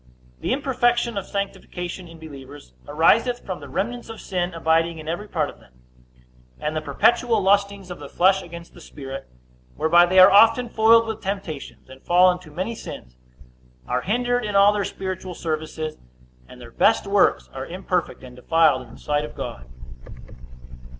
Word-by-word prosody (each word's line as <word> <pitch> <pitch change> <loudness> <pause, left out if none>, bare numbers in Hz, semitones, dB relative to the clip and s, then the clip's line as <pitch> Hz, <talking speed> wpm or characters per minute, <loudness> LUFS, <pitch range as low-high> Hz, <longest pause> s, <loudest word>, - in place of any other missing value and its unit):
The - - -3
imperfection 240 -3 +1
of 200 -2 -4
sanctification 185 -3 -5
in 165 0 -13
believers 145 - -12
ariseth 230 +11 +2
from 185 -4 -5
the 145 -1 -11
remnants 235 - -3
of 225 - -8
sin 180 -1 -3
abiding 165 0 +1
in 155 -1 -10
every 175 +6 -4
part 155 -7 -1
of - - -12
them, - - -22 0.9
and 150 +1 -3
the 155 - -1
perpetual 235 +7 +2
lustings 200 -1 +1
of 180 - -8
the 145 -1 -9
flesh 190 +2 +3
against 170 -1 -11
the 175 - -15
spirit; 135 -3 -9 0.5
whereby 175 +2 +4
they 185 +2 0
are 185 +1 +9
often 225 +4 +5
foiled 230 +1 +5
with 220 -1 -5
temptations, 190 -7 -6
and 130 0 -14
fall 180 +1 +5
into 180 -2 -8
many 185 +9 -4
sins, 60 - -10 0.7
are 125 +1 -1
hindered 245 - 0
in 210 -1 -3
all 200 +1 +6
their 205 -1 -1
spiritual 185 -1 -6
services, 155 -1 -4 0.5
and 125 - -14
their 120 -1 -12
best 225 - +2
works 200 -1 +2
are 135 0 -6
imperfect 180 -4 -3
and 125 -1 -11
defiled 160 +1 +3
in - - -13
the - - -13
sight 145 0 -1
of 150 - -8
God. 60 0 -7
180 Hz, 170 wpm, -23 LUFS, 155-205 Hz, 0.9 s, are